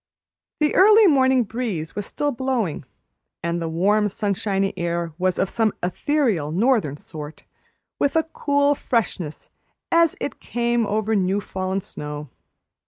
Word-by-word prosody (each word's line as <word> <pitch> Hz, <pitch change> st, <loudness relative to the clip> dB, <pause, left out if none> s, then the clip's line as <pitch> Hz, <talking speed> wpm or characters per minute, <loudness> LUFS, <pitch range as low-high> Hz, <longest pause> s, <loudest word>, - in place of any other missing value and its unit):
The 300 Hz, -1 st, +2 dB
early 425 Hz, +3 st, +7 dB
morning 265 Hz, -6 st, +4 dB
breeze 215 Hz, -8 st, -4 dB
was 205 Hz, 0 st, -3 dB
still 290 Hz, 0 st, -1 dB
blowing, 240 Hz, -, -2 dB, 0.6 s
and 170 Hz, 0 st, -1 dB
the 165 Hz, -, -2 dB
warm, 205 Hz, +6 st, +2 dB
sunshiny 195 Hz, -1 st, -1 dB
air 170 Hz, -2 st, -2 dB
was 185 Hz, 0 st, +1 dB
of -, -, +1 dB
some 220 Hz, +1 st, 0 dB
ethereal 190 Hz, -, 0 dB
northern 200 Hz, -, +1 dB
sort, 150 Hz, 0 st, -9 dB, 0.6 s
with 285 Hz, -, +1 dB
a 320 Hz, -, +4 dB
cool 285 Hz, -2 st, +1 dB
freshness 210 Hz, -, -2 dB, 0.4 s
as 335 Hz, -2 st, +4 dB
it -, -, -4 dB
came 235 Hz, -2 st, 0 dB
over 215 Hz, +1 st, 0 dB
new 195 Hz, 0 st, +1 dB
fallen 190 Hz, 0 st, -3 dB
snow. 150 Hz, -4 st, -7 dB
205 Hz, 135 wpm, -23 LUFS, 175-260 Hz, 0.6 s, early